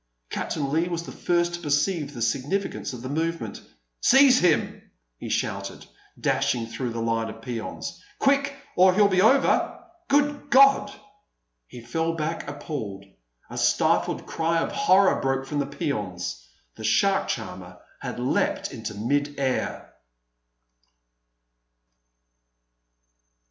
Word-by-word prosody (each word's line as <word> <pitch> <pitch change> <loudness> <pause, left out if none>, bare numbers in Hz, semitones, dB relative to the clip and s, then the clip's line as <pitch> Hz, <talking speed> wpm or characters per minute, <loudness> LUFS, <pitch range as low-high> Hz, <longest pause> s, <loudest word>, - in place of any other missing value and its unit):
Captain 140 -3 -2
Leigh 165 +3 +1
was 170 -1 -3
the - - -9
first 175 0 0
to 175 - -4
perceive 150 0 0
the 120 - -2
significance 140 - -1
of 125 -2 -8
the - - -4
movement. 165 +4 -3 0.4
"Seize 265 -1 +6
him!" 175 -4 +1 0.4
he - - -6
shouted, - - -3 0.3
dashing 115 -2 +1
through 120 +2 -4
the 115 0 -4
line 115 0 -1
of 115 - -10
peons; 115 -3 -6 0.2
"quick, 280 0 +2 0.2
or 185 0 +5
he'll 205 0 +6
be 185 -2 +2
over!... 265 +6 +3 0.3
Good 290 0 +1
God!" 275 0 +6 0.8
He 120 - -11
fell 160 +8 -1
back 160 -1 -3
appalled. 140 -9 -6 0.4
A - - -6
stifled - - +2
cry 165 +1 0
of 165 - 0
horror 200 -8 +4
broke 135 0 0
from 145 +2 -3
the 140 - -1
peons. 105 -11 -4 0.2
The - - -11
shark 195 - +2
charmer 90 -4 -5 0.2
had - - -5
leapt - - 0
into 105 - -6
mid 145 +7 -1
air. 130 -2 -2
150 Hz, 130 wpm, -25 LUFS, 120-185 Hz, 0.8 s, Seize